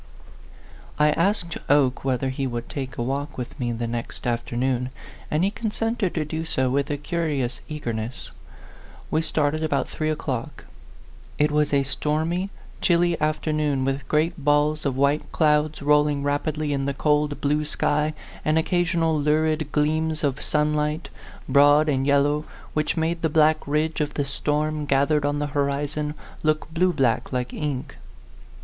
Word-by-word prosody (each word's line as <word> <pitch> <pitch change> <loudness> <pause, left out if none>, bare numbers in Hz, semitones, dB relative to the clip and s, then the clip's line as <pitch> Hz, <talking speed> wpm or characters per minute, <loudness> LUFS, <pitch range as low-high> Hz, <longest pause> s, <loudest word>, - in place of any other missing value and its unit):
I 150 0 +4
asked 170 0 0
Oke 135 -3 +3
whether 130 0 0
he 135 +1 -2
would 120 -1 -4
take 135 -2 -5
a 120 - -1
walk 140 +4 -3
with 125 -2 -6
me 120 -2 -1
the 120 0 -3
next 115 0 -5
afternoon, 125 +1 -1 0.4
and 150 +3 +1
he 195 - +2
consented 225 -2 -2
to 155 -2 0
do 160 +2 -3
so 130 -5 0
with 140 +2 0
a 145 - -1
curious 145 -5 -2
eagerness. 120 -6 -4 0.8
We 155 - +2
started 155 -1 0
about 145 -3 0
three 155 0 -2
o'clock. 135 -6 -4 0.7
It 150 0 +3
was 150 0 +2
a 140 -1 +3
stormy, 160 +7 -1 0.3
chilly 175 -1 +3
afternoon, 155 -3 0
with 135 +1 -2
great 155 +1 0
balls 150 +1 +2
of 130 -2 -2
white 140 +2 +1
clouds 150 -1 +2
rolling 150 -1 +3
rapidly 145 +1 -1
in 135 -1 -1
the 140 0 -1
cold, 150 0 +1
blue 150 +1 +1
sky, 150 0 0 0.3
and 155 +1 +2
occasional 165 -1 +1
lurid 155 0 +1
gleams 155 +1 0
of 140 -2 0
sunlight, 150 +1 0 0.4
broad 145 +3 +5
and 135 -2 +1
yellow, 145 +2 +3 0.3
which 155 +2 0
made 165 +1 0
the 160 - +1
black 155 0 +3
ridge 155 +2 0
of 150 -1 -2
the 145 - 0
storm, 150 +2 -1
gathered 140 +2 +2
on 145 0 0
the 145 - -1
horizon, 145 +1 -1 0.3
look 155 0 0
blue 180 +2 +3
black 130 -8 +1
like 125 -1 -2
ink. 145 -2 -4
150 Hz, 155 wpm, -24 LUFS, 140-155 Hz, 0.8 s, broad